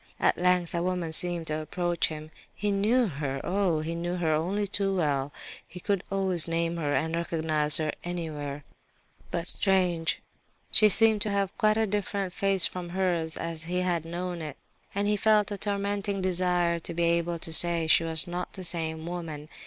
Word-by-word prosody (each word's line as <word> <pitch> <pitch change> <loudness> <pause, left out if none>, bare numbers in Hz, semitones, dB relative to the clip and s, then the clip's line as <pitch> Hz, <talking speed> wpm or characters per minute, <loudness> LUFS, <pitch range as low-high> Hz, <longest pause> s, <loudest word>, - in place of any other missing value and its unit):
At - - +3
length 180 -1 +1
a 170 - 0
woman 180 -2 -2
seemed 175 +1 +2
to 155 0 -2
approach 175 +2 -1
him. 155 0 -8 0.2
He 205 0 -1
knew 220 +6 +2
her, 140 -6 -3
oh! 180 -5 +1
he 160 +2 -3
knew 175 +1 -3
her 165 -3 0
only 185 +7 0
too 195 0 -1
well. 145 -5 0 0.4
He 180 - -10
could 195 0 -1
always 190 -4 0
name 165 0 -1
her 150 -3 -1
and 160 +3 0
recognize 160 -3 +2
her 155 -1 0
anywhere; 150 -5 -5 0.7
but, 170 -1 -2
strange, 180 -5 +1 0.5
she 215 - +5
seemed 220 +1 +4
to 215 - 0
have 200 -1 -1
quite 215 0 +2
a 225 - +2
different 200 -2 -2
face 195 -2 +6
from 180 -1 -4
hers, 175 -3 -1
as 165 -1 -4
he 180 +2 -1
had 175 -3 0
known 175 +1 -4
it, 150 -3 -6 0.4
and 200 +1 0
he 210 - +2
felt 215 0 +3
a 205 - -3
tormenting 200 0 -1
desire 180 -2 +1
to 170 0 -7
be 170 - 0
able 170 0 +1
to 165 0 -3
say 170 0 +5
she 160 +1 +4
was 160 0 -1
not 180 0 -5
the 190 - -7
same 160 -2 -2
woman. 165 -4 -6
175 Hz, 185 wpm, -27 LUFS, 160-195 Hz, 0.7 s, face